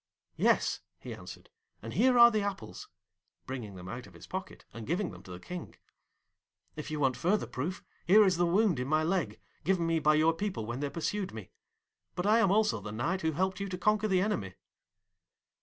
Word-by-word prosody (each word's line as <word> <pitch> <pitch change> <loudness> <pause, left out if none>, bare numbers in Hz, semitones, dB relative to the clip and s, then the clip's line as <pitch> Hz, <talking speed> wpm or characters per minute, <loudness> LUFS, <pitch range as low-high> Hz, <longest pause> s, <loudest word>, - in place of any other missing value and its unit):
'Yes,' - - +2 0.2
he - - -8
answered, - - -11 0.3
'and - - -6
here 255 -1 +4
are 235 0 +9
the 215 -1 +1
apples,' 195 - -5 0.6
bringing 120 -7 -6
them 90 0 -9
out 120 +7 -7
of - - -17
his - - -12
pocket, 190 0 -7
and 115 -2 -8
giving 180 +5 -1
them - - -11
to - - -15
the 90 0 -7
King. 180 - -8 1.0
'If 150 0 -6
you 155 -1 -3
want 135 -3 +2
further 185 - +1
proof, 160 +9 -4 0.2
here 210 +4 +7
is 185 -3 +2
the 175 0 +3
wound 185 - +3
in 125 - -2
my 155 +2 +2
leg 175 +2 -1 0.2
given 175 0 +1
me 165 -1 +1
by 155 0 +4
your 160 +2 +4
people 185 - -3
when 120 +3 -4
they 145 0 -2
pursued 185 - -3
me. 105 -5 -9 0.6
But 180 - -2
I 215 +3 +5
am 200 - +4
also 210 +2 +2
the 105 - -6
Knight 165 - -1
who 160 0 0
helped 190 +4 -1
you 200 0 -3
to 180 - -4
conquer 210 +3 +2
the 185 -3 +2
enemy.' 105 - -2
170 Hz, 205 wpm, -31 LUFS, 135-200 Hz, 1.0 s, are